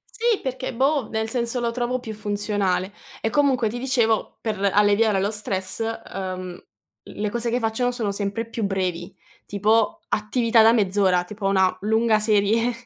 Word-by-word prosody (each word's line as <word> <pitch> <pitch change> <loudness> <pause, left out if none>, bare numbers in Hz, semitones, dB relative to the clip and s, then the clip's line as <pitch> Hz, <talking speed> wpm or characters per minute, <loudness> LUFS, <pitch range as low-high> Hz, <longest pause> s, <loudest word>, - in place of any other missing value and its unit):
Sì, 460 -2 +1
perché 260 0 -4
boh, 270 +1 +1
nel 220 0 -2
senso 235 +1 -1
lo 235 -1 -1
trovo 250 +1 -2
più 220 -2 -7
funzionale 205 -2 -1 0.3
e 225 - 0
comunque 260 -3 +2
ti 235 - -5
dicevo 240 -4 0
per 220 -3 -2
l 200 - -4
alleviare 205 0 +3
lo 195 +1 0
stress, 200 -2 -2
ehm, 185 -5 -5 0.4
le 210 0 -4
cose 235 +2 -2
che 245 - +1
faccio, 225 +1 -1
no, 245 - +2
sono 230 -5 -2
sempre 205 +3 -3
più 230 -1 -4
brevi, 185 -2 -2 0.3
tipo 220 - +1
attività 225 +1 +2
da 225 - +7
mezz'ora, 190 -4 +2
tipo 200 +1 -7
una 190 -1 +3
lunga 220 +1 +2
serie, 215 +2 +2
220 Hz, 170 wpm, -23 LUFS, 200-235 Hz, 0.4 s, da